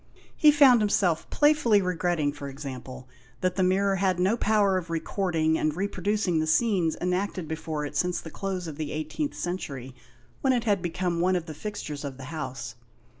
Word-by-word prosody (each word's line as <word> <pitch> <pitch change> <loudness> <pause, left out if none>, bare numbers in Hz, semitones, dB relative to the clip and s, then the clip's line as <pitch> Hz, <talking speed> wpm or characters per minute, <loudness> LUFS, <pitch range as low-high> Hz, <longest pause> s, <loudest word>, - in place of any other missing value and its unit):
He 305 - +6
found 275 -5 +6
himself 190 -5 +1
playfully 295 -8 +4
re 180 -2 -1
gretting, 165 -4 0
for 145 -1 -7
example, 130 -2 -8 0.3
that 185 0 0
the 190 - 0
mirror 195 +1 +2
had 185 -1 +1
no 190 +5 +3
power 210 -4 +2
of 175 -1 -10
recording 165 -1 0
and 155 -1 0
reproducing 195 -1 0
the 155 - 0
scenes 175 -2 +2
enacted 180 -1 -1
before 155 -1 -3
it 145 - -7
since 180 +4 0
the 160 - -9
close 190 -2 -4
of 155 -3 -7
the 155 -2 -3
18th 155 - -3
century, 140 -8 -5 0.5
when 265 -1 +3
it 240 -2 0
had 205 -5 +1
become 175 0 -2
one 185 +1 +3
of 175 -2 -2
the 160 - -7
fixtures 150 -5 -6
of 140 -2 -6
the 135 - -9
house. 130 -7 -5
180 Hz, 185 wpm, -27 LUFS, 155-200 Hz, 0.5 s, He